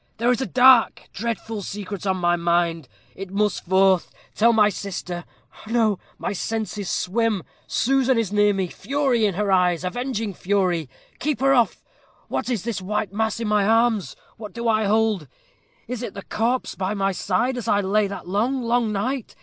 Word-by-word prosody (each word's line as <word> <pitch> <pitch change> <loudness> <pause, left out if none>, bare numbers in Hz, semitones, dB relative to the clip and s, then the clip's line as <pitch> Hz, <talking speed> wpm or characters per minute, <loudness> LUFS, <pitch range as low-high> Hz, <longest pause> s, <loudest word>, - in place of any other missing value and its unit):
'There 235 +2 +2
is 250 - 0
a 265 - -1
dark, 255 -2 +5
dreadful 225 -1 -4
secret 200 0 -6
on 190 -1 +1
my 175 -1 +2
mind 170 -3 0 0.3
it 195 -1 -7
must 205 +1 0
forth. 190 0 +3 0.2
Tell 230 +2 +4
my 215 -2 +5
sister 180 -3 -5 0.4
no, 220 -4 +1 0.2
my - - -3
senses 210 -1 -3
swim 215 -1 0 0.2
Susan 265 0 +2
is 215 -4 -1
near 205 0 +4
me 195 -2 -1
fury 250 - 0
in 195 - -2
her 205 0 0
eyes 180 -2 +2
avenging 225 +1 -3
fury 180 -6 0 0.3
keep 295 +1 -1
her 270 +1 +4
off. 240 -3 +2 0.5
What - - -2
is 230 -7 -1
this 225 -4 -3
white 200 0 -2
mass 220 +1 -1
in 230 - -2
my 210 -1 +2
arms? 225 - +2 0.2
what 210 -1 -9
do 235 0 -3
I 220 -1 +2
hold? 215 -6 +1 0.6
is 250 -2 -4
it 235 - -6
the 200 - -7
corpse 240 +4 -1
by 190 +2 -2
my 195 -1 +1
side, 200 +7 0
as 245 - -5
it 205 -1 +2
lay 205 +2 +2
that 200 -2 -8
long, 240 +8 0
long 235 -1 +1
night? 245 +5 -3
210 Hz, 180 wpm, -23 LUFS, 190-235 Hz, 0.6 s, dark